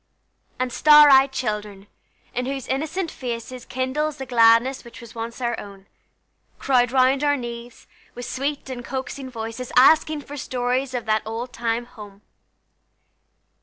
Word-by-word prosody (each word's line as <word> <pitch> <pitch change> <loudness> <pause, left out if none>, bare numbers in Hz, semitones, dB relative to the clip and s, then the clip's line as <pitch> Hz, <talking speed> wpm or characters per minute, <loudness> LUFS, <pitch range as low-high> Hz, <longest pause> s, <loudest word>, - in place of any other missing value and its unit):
And 255 -1 -2
star 300 -1 +7
eyed 270 0 +6
children, 210 -6 -4 0.5
in 250 +1 -2
whose 270 -2 -4
innocent 315 +6 -2
faces 245 0 -6
Kindles 280 +4 -2
the 265 - -6
gladness 235 +2 +4
which 235 - -13
was 235 -1 -12
once 230 +1 -6
our 240 -1 -1
own, 200 -1 -11 0.7
Crowd 245 -3 +2
round 265 +2 +3
our 290 0 +2
knees, 240 -1 -8 0.3
with 245 - -7
sweet 280 +3 -3
and 245 -1 -6
coaxing 265 +1 -6
voices, 230 +1 -6
Asking 310 +3 +5
for 290 +1 -9
stories 255 0 -2
of 240 -2 -3
that 215 0 +1
old 230 +3 -6
time 230 0 -2
home. 210 -4 -13
250 Hz, 145 wpm, -23 LUFS, 230-270 Hz, 0.7 s, star